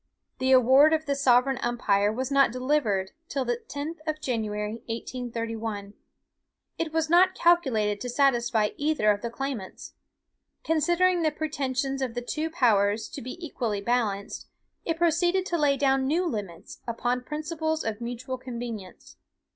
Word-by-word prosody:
The 260 +1 +1
award 265 +4 +6
of 315 0 0
the 285 - 0
sovereign 265 -1 +3
umpire 210 -4 +1
was 255 +4 -3
not 275 -3 +4
delivered 250 -7 0 0.2
till 270 -2 -1
the 240 -1 0
10th 300 +4 -5
of 310 0 -1
January, 215 -5 -2
1831. 230 -3 -4 0.9
It 330 -1 -1
was 320 0 0
not 365 +3 +5
calculated 245 -13 +2
to 250 - -4
satisfy 240 -4 +2
either 290 -8 +2
of 205 0 -2
the 235 - -3
claimants. 245 -6 -6 0.7
Considering 345 +3 +2
the 315 - +3
pretensions 275 -3 -2
of 250 -3 -2
the 245 - -3
two 310 +6 -2
powers 220 -8 +2
to - - -7
be 255 +7 -7
equally 225 -9 -2
balanced, 205 -2 -1 0.4
it 330 -1 -1
proceeded 345 +2 +2
to 345 -3 -1
lay 285 -2 +3
down 270 -1 +2
new 335 +6 +1
limits, 200 - -5
upon 245 +2 -1
principles 315 +3 -3
of 220 0 -4
mutual 245 +2 -5
convenience. 235 -6 -8
255 Hz, 145 wpm, -27 LUFS, 230-305 Hz, 0.9 s, award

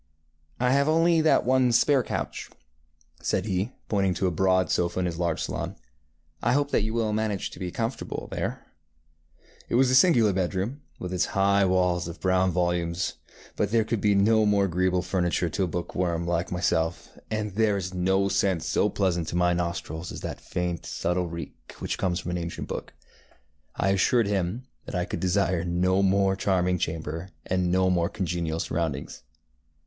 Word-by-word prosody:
ŌĆ£I 125 0 +2
have 140 +2 +3
only 165 +1 +4
that 155 - +3
one 130 0 +3
spare 135 +3 +4
couch, - - -4
ŌĆØ - - -32
said 95 - 0
he, 100 +3 -1 0.2
pointing 95 -3 +1
to 90 - -1
a 90 - +2
broad 95 +2 +2
sofa 85 +1 0
in 90 - 0
his 85 -1 -3
large 85 -2 0
salon; - - -4 0.7
ŌĆ£I 120 - +2
hope 145 +1 +1
that - - +3
you 110 +1 -2
will 110 -2 0
manage 105 -3 -1
to - - -11
be 90 - -3
comfortable 115 +7 -4
there. - - -3
ŌĆØ 75 +5 -39 0.2
It - - 0
was 130 +1 +4
a - - +2
singular 125 - +5
bedroom, 95 +9 -2 0.2
with 90 0 -5
its 90 -1 +2
high 100 0 +4
walls 90 -2 +1
of 85 - -8
brown 95 0 +2
volumes, 85 -1 -1 0.4
but 105 - 0
there 115 0 +3
could 110 -1 -2
be 105 -1 +3
no 110 +2 +4
more 100 -1 +3
agreeable 90 0 +1
furniture 90 -1 0
to 95 +5 -1
a - - -3
bookworm 85 0 -2
like 85 +1 -1
myself, 85 -1 -1
and 105 -2 -2
there 105 -1 +2
is 90 -1 -4
no 95 +2 +2
scent 95 -4 +1
so - - +1
pleasant 90 -4 0
to - - -4
my 90 0 +3
nostrils 85 -1 -3
as - - -7
that - - -6
faint, 90 -2 -3
subtle 90 +1 -1
reek 85 0 -9
which - - -4
comes 90 -3 0
from 90 - -5
an 90 - -2
ancient 85 0 -5
book. - - -5 0.8
I 95 - +1
assured 105 +5 +3
him 100 +3 -1 0.2
that - - -5
I 90 0 0
could - - -4
desire 90 -2 +1
no 90 +2 +1
more 95 0 +3
charming 90 -2 +1
chamber, 80 +2 -3 0.2
and 90 -1 0
no 95 0 +3
more 85 -1 +1
congenial 85 -5 -2
surroundings. 75 -5 -3
95 Hz, 185 wpm, -26 LUFS, 85-105 Hz, 0.8 s, singular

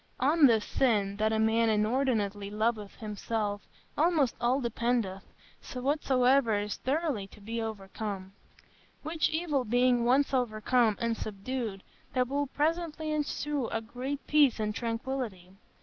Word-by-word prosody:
On 290 +3 +5
this 225 -3 +3
sin, 205 -6 +1
that 215 +1 +1
a 220 - +1
man 225 +1 +3
inordinately 215 -2 0
loveth 215 -1 -1
himself, 210 -1 -3 0.3
almost 305 -5 +2
all 245 +3 +2
dependeth, 235 -5 -1 0.5
whatsoever 255 -3 +2
is 205 0 -3
thoroughly 275 -7 -1
to 200 - -16
be 225 +3 -4
overcome; 200 -2 -5 0.7
which 315 +1 0
evil 315 -5 0
being 245 +1 +3
once 270 +4 +3
overcome 230 -2 +2
and 230 -1 0
subdued, 215 -1 -4 0.3
there 255 0 +3
will 285 +3 -1
presently 315 +2 -1
ensue 295 -3 -1 0.2
great 270 +3 -4
peace 290 -6 +4
and 210 -1 -1
tranquillity.... 230 -5 -4
235 Hz, 125 wpm, -30 LUFS, 215-275 Hz, 0.7 s, On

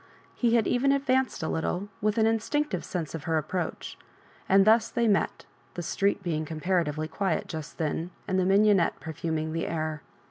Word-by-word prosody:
He 235 -1 +2
had 225 -3 +3
even 265 +3 +2
advanced 265 -6 +1
a - - -1
little, 180 +5 -2
with 215 +1 +1
an 220 - +4
instinctive 225 +7 0
sense 170 -6 -4
of 155 -3 -6
her 160 -1 +1
approach; 165 +3 -4 0.5
andjthus 215 +4 +5
they 235 -1 +1
met, 200 -2 +1 0.3
the 175 - -4
street 200 +4 0
being 160 -3 -1
comparatively 155 -1 -1
quiet 185 +1 -1
just 155 -2 -7
then, 160 +2 -2 0.2
and 190 -2 +1
the 185 - +2
mignonette 195 -1 +4
perfuming 160 0 -3
the 165 - -2
air. 155 -2 -3
185 Hz, 170 wpm, -27 LUFS, 160-220 Hz, 0.5 s, andjthus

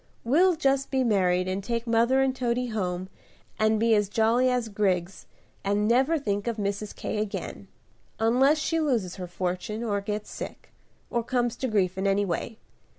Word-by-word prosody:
We'll 345 +9 +4
just 275 -2 +1
be 265 -1 +1
married 185 -5 +2
and 190 +1 -2
take 235 +2 -2
mother 235 +3 +3
and 265 -1 0
Toady 245 -1 -1
home 185 -4 -2 0.5
and 215 0 +3
be 230 0 +3
as 205 -2 +2
jolly 230 +4 +3
as 250 -2 0
grigs, 190 -3 -1 0.4
and 205 +1 +1
never 265 +8 +3
think 205 -6 -2
of 230 -1 -1
Mrs. 205 0 -3
K. 210 - -3
again, 210 -1 -5 0.5
unless 255 +7 +4
she 325 +2 0
loses 235 - 0
her 180 -1 -5
fortune, 185 +5 -3
or 205 -3 -1
gets 210 +1 -4
sick, - - -8 0.4
or 235 - +1
comes 240 -1 0
to 260 - -2
grief 190 -5 0
in 195 - 0
any 200 +1 +2
way. 200 +5 -3
220 Hz, 175 wpm, -26 LUFS, 200-250 Hz, 0.5 s, We'll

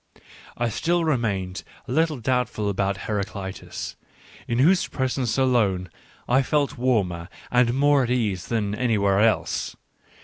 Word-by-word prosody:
I 120 0 0
still 170 +9 0
remained 100 - -1 0.2
a - - -6
little 160 +1 +2
doubtful 120 -3 0
about 100 0 -1
Heraclitus, 100 -2 -4 0.5
in 115 - -1
whose 175 +8 +4
presence, 130 -2 -1
alone, 105 -9 +2 0.4
I 130 +2 +4
felt 145 +1 0
warmer 95 -9 0 0.2
and 125 -1 +3
more 140 -1 +4
at - - -5
ease 105 -8 0
than 105 -3 -1
anywhere 105 -4 +2
else. 110 +1 +1
115 Hz, 130 wpm, -24 LUFS, 100-130 Hz, 0.5 s, whose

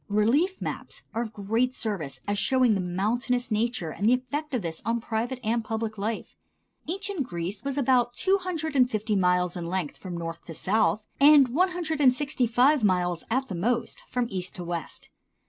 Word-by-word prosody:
Relief 255 - +2
maps - - -5
are 230 - -1
of 230 -2 -4
great 225 +5 0
service 160 - -3
as 205 0 0
showing 255 +2 +3
the 200 - 0
mountainous 225 +8 -1
nature 215 -6 -1
and 205 +7 +1
the 250 - +6
effect 285 +5 -4
of 235 - -1
this 165 -1 -5
on 230 +1 0
private 235 +3 -3
and 230 +1 0
public 220 0 -3
life. 215 +2 -4 0.5
Ancient 390 0 -2
Greece 190 -2 -3
was 275 0 -3
about 245 -3 +2
two 390 +6 +2
hundred 320 -5 -3
and 250 -2 +5
fifty 215 -2 -1
miles 180 -2 +2
in 170 -2 -4
length 175 -4 -2
from 180 -3 -6
north 165 0 -5
to 165 - -7
south 215 +3 +1
and 285 -2 +7
one 360 +10 +2
hundred 325 -4 -2
and 255 -3 +6
sixty 275 -3 +1
five 250 +4 +4
miles 180 -3 +1
at 260 +3 0
the - - -5
most 230 +7 -1
from 250 -1 0
east 185 -1 -3
to 180 - -5
west. 170 -2 -5
230 Hz, 195 wpm, -27 LUFS, 190-260 Hz, 0.5 s, and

